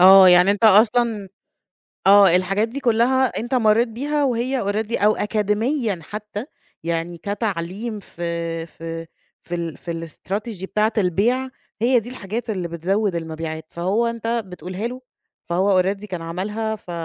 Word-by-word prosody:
آه 190 +1 +9
يعني 180 +2 +6
أنت 205 +3 +1
أصلًا 215 0 +4 0.8
آه 195 -3 +7
الحاجات 195 +4 +1
دي 250 +5 -6
كلها 250 +1 +3
أنت 240 +4 -4
مرّيت 230 0 +4
بيها 285 +6 -1
وهي 255 0 0
already 210 +2 -1
أو 215 +1 +5
أكاديميًا 210 - 0
حتى 210 - -6 0.4
يعني 170 +1 -2
كتعليم 205 +2 -3
في 170 -2 -4
في 165 0 -7 0.4
في 175 - -5
ال 170 -2 -4
في 165 -1 -5
الstrategy 200 +5 -5
بتاعة 215 +3 +1
البيع، 220 +8 +1 0.3
هي 245 +1 +4
دي 230 +3 -9
الحاجات 230 0 -5
اللي 185 -5 -2
بتزوّد 185 +4 -1
المبيعات، 160 -1 -5
فهو 190 +7 0
أنت 230 -1 -4 0.2
بتقولها 185 +4 -5
له، 255 +1 -8 0.5
فهو 185 +2 +3
already 195 +3 -2
كان 180 -5 -5
عملها 210 +6 -3
ف 185 - -11
205 Hz, 145 wpm, -22 LUFS, 175-230 Hz, 0.8 s, آه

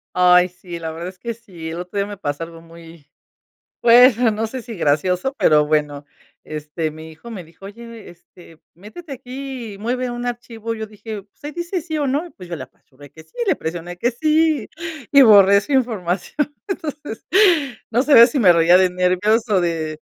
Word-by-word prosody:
Ay, 180 0 +5
sí, 180 -1 -9
la 160 -1 -5
verdad 165 +2 -7
es 185 - -14
que 235 -1 -4
sí. 185 -8 -10
El 165 +1 -6
otro 180 +3 -7
día 200 - +1
me 205 0 -8
pasó 145 -3 -4
algo, 165 0 -10
muy 165 -2 -15 0.7
pues 240 0 +7 0.2
no 220 +1 -2
sé 255 +3 -7
si 230 -2 -9
gracioso, 180 - 0
pero 150 - +4
bueno, 150 -1 -1 0.4
este, 155 +1 -4
mi 160 +1 -11
hijo 160 +10 -13
me 195 -5 -7
dijo: 165 +4 -18
"Oye, 230 +1 -11
este, 170 -1 -18
métete 220 - -12
aquí 260 -2 -7
y - - -13
mueve 250 +4 -2
un 240 0 -5
archivo". 230 -2 -5
Y - - -9
yo 220 - -4
dije: 215 0 -8
"Pues 205 - -30
ahí 295 - -4
dice 345 +2 -3
sí 315 -1 -5
o 290 - 0
no". 300 +7 -2
Pues 180 -2 -11
yo 170 - -4
le 135 - -7
apachurré 135 +2 -19
que 160 +3 -14
sí, - - -33
le 385 - +2
presioné 175 +2 -6
que 240 +6 +1
sí, 310 0 +1 0.4
y 280 -1 +8
borré 200 -4 +7
su 285 - -7
información. 235 - -1
Entonces, 295 - -6 0.7
no 235 +2 +2
sabía 255 -6 +8
si 265 - -2
me 190 -8 +6
reía 170 +1 +5
de 185 0 +4
nervios 185 +6 +1
o 200 -3 +2
de 160 -3 -2
200 Hz, 200 wpm, -20 LUFS, 170-240 Hz, 0.7 s, y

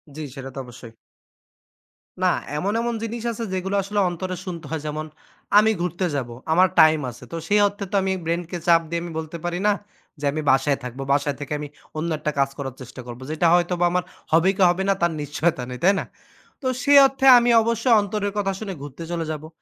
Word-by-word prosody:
জ্বি, 155 - -6
সেটা 135 0 -7
তো 135 - -4
অবশ্যই। 120 -2 -12 1.3
না। - - +4 0.3
এমন, 195 +7 -1
এমন, 235 0 -1
জিনিস 230 +1 -4
আছে 230 +1 -5
যেগুলো 190 +2 -2
আসলে 205 +2 -2
অন্তরে 185 +2 -4
শুনতে 170 -4 -6
হয় 160 -2 -2
যেমন 155 +1 -4 0.5
আমি 220 +1 +4
ঘুরতে 175 +1 -1
যাবো। 120 -4 -3 0.2
আমার 185 +2 +5
time 155 -1 +6
আছে। 120 - -14
তো - - -5
সেই 210 +3 +3
অর্থে 200 0 -6
তো 205 - -1
আমি 190 - 0
brain 170 +1 0
কে 175 - -2
চাপ 165 -1 +6
দিয়ে 170 0 -2
আমি 175 - -6
বলতে 160 +1 -6
পারি 175 +1 -2
না, - - +5 0.5
যে, 145 - -11
আমি 155 - -3
বাসায় 135 +1 +2
থাকবো। 125 +2 -6
বাসায় 145 0 0
থেকে 145 +1 -5
আমি 150 - -5 0.3
অন্য 165 +2 -2
একটা 150 - -1
কাজ 135 0 +3
করার 135 -3 -5
চেষ্টা 130 +1 -9
করবো। 120 +1 -8
যেটা 160 +2 +2
হয়তোবা 175 0 +2
আমার 180 0 +1 0.3
হবে 165 +4 +4
কি - - -1
হবে 180 +2 0
না - - +5
তার 170 - +3
নিশ্চয়তা 145 0 -1
নেই, 125 - -6
তাই 195 +3 +6
না? - - -4 0.6
তো 265 - -10 0.2
সেই 285 0 +6
অর্থে 270 0 -3
আমি 240 0 +3
অবশ্যই 230 +2 +2
অন্তরের 205 0 -2
কথা 195 -1 0
শুনে 200 -3 -5
ঘুরতে 145 +3 -8
চলে 170 -1 -2
যাবো। 155 0 -6
170 Hz, 215 wpm, -23 LUFS, 145-195 Hz, 1.3 s, time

